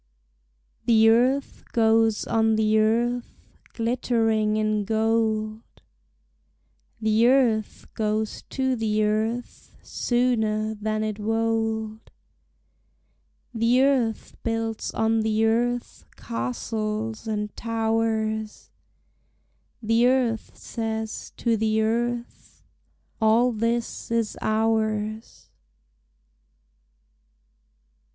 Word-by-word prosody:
The 225 -1 +5
earth 255 +5 +2
goes 225 -1 +3
on 225 -1 +2
the 215 0 +3
earth 235 +3 -1 0.2
glittering 225 -2 +1
in 215 -1 0
gold, 220 0 0 1.4
The 220 +1 +3
earth 245 -5 +2
goes 215 0 -2
to 260 -1 0
the 215 -2 0
earth 220 +3 -2
sooner 220 -3 0
than 215 0 -2
it 215 -1 -3
wold; 225 0 -1 1.4
The 235 +3 +3
earth 255 -5 0
builds 225 -1 -2
on 225 0 +1
the 220 0 +1
earth 240 +2 -1
castles 215 - -4
and 210 -1 -3
towers, 220 -1 -2 1.1
The 225 +2 +3
earth 250 -4 0
says 220 -1 -4
to 235 -2 +1
the 220 0 +1
earth 235 +2 -2 0.6
All 225 +3 +4
this 230 +1 -2
is 230 -2 0
ours. 215 0 -1
225 Hz, 80 wpm, -25 LUFS, 215-230 Hz, 1.4 s, The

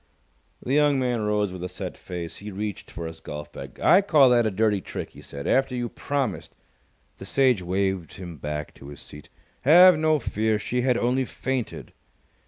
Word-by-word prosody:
The 130 - -2
young 145 -1 +4
man 125 -3 0
rose 105 -2 0
with 90 -1 -7
a 90 - -4
set 90 0 -6
face. 85 -2 -7
He 105 - -8
reached 105 0 -5
for 85 - -7
his 80 0 -8
golf 75 -1 -8
bag. - - -10
"I 190 - +6
call 150 -9 +5
that 120 -2 +4
a - - +2
dirty 105 0 +1
trick," - - -6
he - - -14
said, 70 0 -9
"after 135 -1 +2
you 120 -1 -2
promised 135 -9 -3 0.3
" 70 - -41
The 95 - -8
Sage 125 -1 +2
waved 95 -1 -1
him 85 -3 -9
back 75 +1 -5
to 70 - -13
his 70 - -10
seat. 75 0 -13 0.3
"Have 175 +3 +7
no 155 0 +3
fear! 110 -5 0
She 125 +4 -2
had 125 -1 +2
only 125 +2 +1
fainted." 130 -2 -4
105 Hz, 195 wpm, -25 LUFS, 90-130 Hz, 0.3 s, Have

